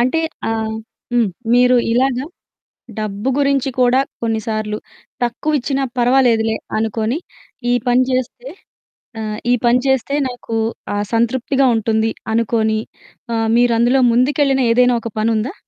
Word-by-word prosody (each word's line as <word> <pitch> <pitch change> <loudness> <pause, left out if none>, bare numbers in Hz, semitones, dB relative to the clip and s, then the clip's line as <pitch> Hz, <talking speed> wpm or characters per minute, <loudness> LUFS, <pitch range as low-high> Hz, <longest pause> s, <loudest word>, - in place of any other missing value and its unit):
అంటే 255 +7 +2 0.3
ఆహ్, 220 -1 -2 0.4
హ్మ్. 240 -3 +3 0.3
మీరు 250 +1 +5 0.2
ఇలాగా 255 +1 +1 0.7
డబ్బు 210 +2 -3
గురించి 275 -1 +1
కూడా 250 +1 +4 0.2
కొన్ని 225 -1 0
సార్లు 215 -1 -2 0.4
తక్కువిచ్చినా 275 +2 -1 0.2
పర్వాలేదులే 240 -3 +3 0.2
అనుకొని 225 +4 -1 0.5
ఈ - - +4
పని 245 +1 +4
జేస్తే 255 0 -3 0.7
ఆహ్, 215 -1 -4
ఈ - - +5
పని 240 +1 +4
చేస్తే 265 +1 +1
నాకు 245 -2 -6 0.4
ఆహ్, 205 0 -1
సంతృప్తిగా 260 +4 +1
ఉంటుంది 220 0 0 0.2
అనుకొని 220 -1 +1 0.6
ఆహ్, 225 0 0
మీరందులో 240 +2 +3
ముందుకెళ్ళిన 270 +2 +2
ఏదైనా 250 +1 +4
ఒక 230 -1 -6
పనుందా? 225 - 0
240 Hz, 120 wpm, -18 LUFS, 220-260 Hz, 0.7 s, మీరు